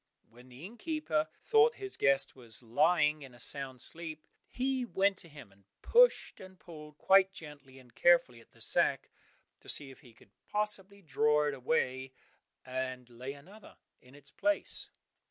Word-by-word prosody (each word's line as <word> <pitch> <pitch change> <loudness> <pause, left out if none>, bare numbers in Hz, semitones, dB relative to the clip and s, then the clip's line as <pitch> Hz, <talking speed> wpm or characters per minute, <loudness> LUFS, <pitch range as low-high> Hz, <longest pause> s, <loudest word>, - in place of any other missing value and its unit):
When 120 +2 -17
the 130 +6 -11
inn 225 +5 -11
keeper 215 - -1 0.2
thought 450 +1 +4
his 395 -1 -6
guest 140 -1 +2
was 120 -2 -3
lying 150 +5 +2
in 130 -3 -12
a - - -17
sound 130 -1 -3
sleep, 160 -2 -5 0.2
he 260 0 -1
went 200 -4 +1
to 170 - -7
him 145 -9 -13
and 100 0 -26 0.2
pushed - - +4
and 185 -1 -13
pulled 150 -3 -12
quite 190 +2 +5
gently 150 -6 -12
and 125 -2 -17
carefully 170 -9 +3
at - - -22
the - - -19
sack - - 0 0.5
to - - -13
see 140 -2 -3
if 130 - -16
he 120 -4 -18
could 100 - -22 0.2
possibly 200 -1 -2
draw 150 -1 +2
it 145 - -1
away 130 -1 -1 0.5
and 130 -1 -5
lay 125 +3 -7
another 190 +9 -15 0.2
in 125 +2 -18
its 145 -1 -18
place. 305 0 0
150 Hz, 170 wpm, -32 LUFS, 130-190 Hz, 0.5 s, quite